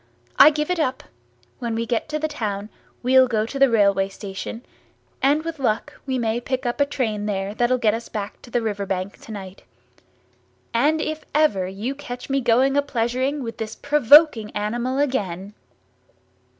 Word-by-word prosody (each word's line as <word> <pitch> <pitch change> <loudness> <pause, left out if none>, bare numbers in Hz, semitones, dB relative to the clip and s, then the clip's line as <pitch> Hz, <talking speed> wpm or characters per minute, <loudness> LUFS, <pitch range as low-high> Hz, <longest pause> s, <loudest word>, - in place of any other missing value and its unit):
I 300 - +10
give 300 +2 -2
it 360 - 0
up—when 120 - -5
we 230 +1 -1
get 235 +4 -2
to 305 - -1
the 310 +1 -1
town 210 -8 -4 0.3
we'll 260 +1 +5
go 220 -3 0
to 275 +4 -6
the 275 -1 +6
railway 200 -3 +3
station, 200 +4 -7 0.6
and 290 +4 +2
with 330 -2 -5
luck 250 +3 -1
we 260 -1 0
may 230 0 -1
pick 260 +1 -3
up 240 +4 -1
a 285 - +4
train 220 -7 -2
there 195 0 -2
that'll 240 +3 +2
get 220 -4 +2
us 230 +1 -5
back 205 -1 -6
to 240 0 -2
riverbank 200 -3 -3
to - - -11
night. 195 -2 -8 1.1
And 300 +7 +2
if 310 0 -3
ever 210 -12 +3
you 205 +8 -4
catch 260 -2 -8
me 275 0 +1
going 255 +3 +3
a 285 - +4
pleasuring 260 +2 -1
with 230 -1 -6
this 220 0 -5
provoking 285 -4 +5
animal 235 +5 -2
again!" 205 -9 -2
240 Hz, 170 wpm, -22 LUFS, 210-275 Hz, 1.1 s, I